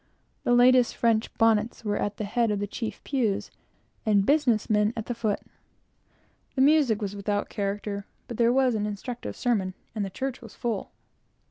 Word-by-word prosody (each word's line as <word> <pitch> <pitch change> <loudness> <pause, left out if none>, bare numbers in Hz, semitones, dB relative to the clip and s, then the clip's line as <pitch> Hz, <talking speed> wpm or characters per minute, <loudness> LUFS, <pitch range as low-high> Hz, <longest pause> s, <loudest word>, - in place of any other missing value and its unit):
The 245 - +3
latest 250 0 +5
French 225 -1 +1
bonnets 225 0 +2
were 205 -1 0
at 205 0 -2
the - - -3
head 230 +3 +1
of 210 - 0
the 205 - -1
chief 220 +2 -5
pews, 235 -8 -1 0.5
and 205 -3 +3
business 275 -7 +3
men 210 +1 +2
at 220 - -3
the 245 - -2
foot. 220 -3 -1 1.1
The 260 - +2
music 270 -7 +4
was 200 0 -3
without 205 0 -2
character, 200 -1 -3 0.2
but 235 - -6
there 235 0 +4
was 260 -1 +3
an 210 -1 -1
instructive 220 +4 -5
sermon, 200 -7 0 0.2
and 215 -2 -2
the 195 - -3
church 260 +6 -4
was 225 -5 -12
full. 230 -5 -3
220 Hz, 175 wpm, -27 LUFS, 205-245 Hz, 1.1 s, latest